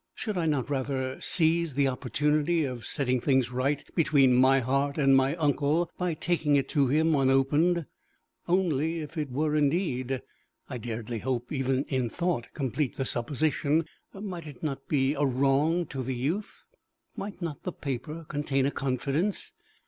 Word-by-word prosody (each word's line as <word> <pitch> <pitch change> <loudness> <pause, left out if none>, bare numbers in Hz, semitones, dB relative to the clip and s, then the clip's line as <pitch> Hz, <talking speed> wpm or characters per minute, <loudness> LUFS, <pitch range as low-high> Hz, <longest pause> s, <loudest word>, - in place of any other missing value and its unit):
Should 215 -3 -3
I 170 -3 0
not 145 -5 0
rather 130 -1 -2
seize 165 -3 +2
the 140 -1 +3
opportunity 150 +6 +1
of 125 -5 -4
setting 130 -3 0
things 130 -2 +2
right 135 +3 -1
between 140 -6 +4
my 130 +2 +5
heart 140 +3 0
and 135 -2 +5
my 135 +3 +3
uncle 155 +2 +1
by 180 -3 -1
taking 160 -3 +1
it 140 - +2
to 140 -4 +2
him 160 +4 +3
unopened? 145 +5 +3 0.6
Only, 165 -3 +1
if 150 +2 -8
it 150 -3 -2
were 150 +4 0
indeed 140 -4 0 0.4
I 125 - -5
dared 115 0 -5
hardly 120 +3 -2
even 135 0 +1
in 130 -5 -1
thought 170 -5 -2
complete 135 0 -1
the 135 - -2
supposition 150 +5 0 0.3
might 185 -5 -7
it 145 -1 -11
not 140 -3 -3
be 135 -2 +2
a 145 0 -1
wrong 140 +6 +2
to 135 - -4
the 130 0 -3
youth? 160 - -3 0.5
Might 200 -2 -6
not 165 -5 -5
the 180 - -4
paper 150 +3 -5
contain 145 -2 0
a 140 - +1
confidence? 140 +9 -1
140 Hz, 160 wpm, -28 LUFS, 130-160 Hz, 0.6 s, my